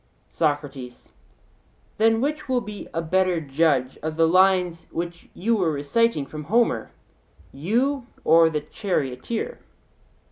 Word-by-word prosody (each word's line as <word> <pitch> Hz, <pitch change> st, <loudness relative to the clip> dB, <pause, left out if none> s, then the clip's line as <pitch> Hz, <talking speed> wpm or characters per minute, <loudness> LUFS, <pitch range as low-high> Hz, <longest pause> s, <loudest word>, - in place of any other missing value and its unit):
SOCRATES: 145 Hz, -5 st, -3 dB, 0.9 s
Then 225 Hz, +1 st, +4 dB
which 300 Hz, +1 st, -2 dB
will 255 Hz, -1 st, +2 dB
be 210 Hz, -2 st, -8 dB
a 165 Hz, -, -2 dB
better 185 Hz, +1 st, +2 dB
judge 140 Hz, -3 st, +1 dB
of 155 Hz, 0 st, -3 dB
the 165 Hz, 0 st, +4 dB
lines 180 Hz, -1 st, +3 dB
which 170 Hz, 0 st, -6 dB
you 230 Hz, +5 st, +1 dB
were 175 Hz, -5 st, +1 dB
reciting 150 Hz, +4 st, +1 dB
from 150 Hz, +1 st, -8 dB
Homer, 220 Hz, -, +1 dB, 0.6 s
you 240 Hz, -, 0 dB, 0.2 s
or 165 Hz, +1 st, +6 dB
the 155 Hz, -2 st, -2 dB
charioteer? 185 Hz, -, -3 dB
170 Hz, 120 wpm, -24 LUFS, 150-220 Hz, 0.9 s, or